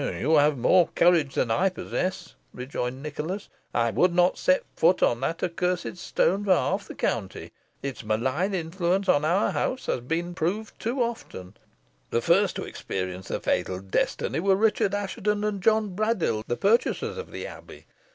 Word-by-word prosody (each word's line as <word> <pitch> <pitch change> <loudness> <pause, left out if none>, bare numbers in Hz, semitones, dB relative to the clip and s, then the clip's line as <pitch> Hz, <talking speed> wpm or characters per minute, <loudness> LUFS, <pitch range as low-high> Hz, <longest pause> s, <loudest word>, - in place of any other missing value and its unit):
"You 155 +3 +1
have 145 -1 +4
more 175 +8 +4
courage 170 -5 +3
than 115 - +1
I 190 +12 +3
possess," 185 -1 -4 0.2
rejoined 125 +1 -4
Nicholas. 155 +6 -5 0.2
"I 115 -1 +1
would 175 - +2
not 180 0 +4
set 275 0 +2
foot 170 +3 +3
on 120 - +3
that 150 +5 -2
accursed 180 0 -1
stone 195 +3 +1
for 190 -2 +4
half 195 +3 -1
the - - -9
county. 100 -5 -3 0.3
Its 135 -3 -5
malign 130 - 0
influence 180 +3 -1
on 145 -5 +4
our 175 +6 +2
house 260 - -2
has - - 0
been 165 +8 -2
approved 180 +6 -3
too 245 +3 0
often. 110 - -6 0.5
The - - +1
first - - +3
to - - -3
experience 95 0 -5
the - - -2
fatal 95 -1 -1
destiny 100 +7 -1
were 195 +2 +3
Richard 205 -1 +2
Assheton 205 +1 -1
and 210 -2 -1
John 215 -2 +2
Braddyll, 190 - 0
the 120 - -1
purchasers 230 - +1
of 465 - -7
the - - -6
Abbey. - - -11
175 Hz, 170 wpm, -26 LUFS, 135-200 Hz, 0.5 s, have